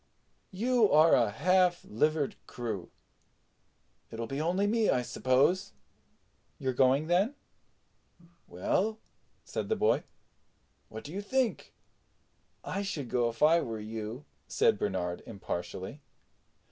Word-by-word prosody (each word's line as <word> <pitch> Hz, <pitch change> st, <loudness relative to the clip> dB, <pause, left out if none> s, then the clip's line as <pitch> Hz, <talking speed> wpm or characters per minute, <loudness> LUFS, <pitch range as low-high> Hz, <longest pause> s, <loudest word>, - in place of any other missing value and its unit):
You 230 Hz, +2 st, +2 dB
are 155 Hz, +2 st, +6 dB
a 115 Hz, -4 st, +4 dB
half 180 Hz, -, +2 dB
livered 150 Hz, +6 st, 0 dB
crew. 110 Hz, -7 st, -5 dB, 1.2 s
It'll 115 Hz, +1 st, -5 dB
be 135 Hz, +5 st, -4 dB
only 180 Hz, +5 st, +1 dB
me, 220 Hz, +1 st, +2 dB
I 125 Hz, -, +2 dB
suppose." 130 Hz, +10 st, +1 dB, 0.8 s
"You're 130 Hz, -1 st, -2 dB
going, 135 Hz, +4 st, +3 dB
then?" 190 Hz, -, +2 dB, 1.1 s
"Well," 200 Hz, -, 0 dB, 0.5 s
said -, -, -4 dB
the 445 Hz, -, +2 dB
boy, 435 Hz, -, +2 dB, 0.9 s
"what -, -, -8 dB
do 150 Hz, -, -9 dB
you 200 Hz, -, -3 dB
think?" 255 Hz, +3 st, -1 dB, 0.9 s
"I 200 Hz, -, -3 dB
should 165 Hz, -11 st, -4 dB
go 120 Hz, -1 st, +2 dB
if 115 Hz, -, -4 dB
I 165 Hz, +2 st, +6 dB
were 115 Hz, -6 st, -4 dB
you," 110 Hz, +4 st, -6 dB, 0.2 s
said -, -, +2 dB
Bernard 90 Hz, 0 st, -2 dB
impartially. 95 Hz, +4 st, -6 dB
150 Hz, 120 wpm, -30 LUFS, 115-190 Hz, 1.2 s, are